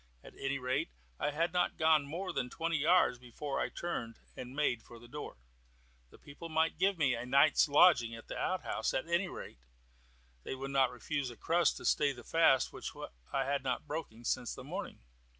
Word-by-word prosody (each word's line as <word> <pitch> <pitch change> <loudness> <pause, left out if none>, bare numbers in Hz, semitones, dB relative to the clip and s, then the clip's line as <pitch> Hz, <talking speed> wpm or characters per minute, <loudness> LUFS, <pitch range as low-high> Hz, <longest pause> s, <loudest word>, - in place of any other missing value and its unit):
At - - -13
any 135 0 -2
rate, 130 - -1 0.3
I - - +1
had 165 +4 -1
not 180 0 +1
gone 155 -3 +4
more 180 +6 -4
than 125 - -2
twenty 165 +2 -1
yards 155 -4 +4
before 125 +3 -5
I - - 0
turned 115 -10 -4 0.2
and 125 +1 -8
made 135 -6 +1
for 120 - -13
the 120 +1 -14
door. 145 +4 -7 0.7
The - - -16
people 145 +4 -10
might 160 0 +1
give 195 0 +3
me 140 -5 +3
a 115 0 -3
night's 140 +5 +4
lodging 140 -6 +5
in 115 0 -8
the - - -7
outhouse; 185 -1 -1
at 130 - -1
any 170 +3 +1
rate, 175 - -9 0.8
they 130 - -5
would 135 +1 -5
not 135 -2 +4
refuse 125 +3 -3
a 120 - -11
crust 170 +1 +2
to - - -9
stay 145 -2 +3
the 120 -2 -12
fast 150 -5 +3
which - - -6 0.4
I 135 -1 0
had 140 0 0
not 130 +1 -2
broken 145 -7 -6
since - - -1
the - - -9
morning. - - -6
140 Hz, 200 wpm, -33 LUFS, 125-165 Hz, 0.8 s, lodging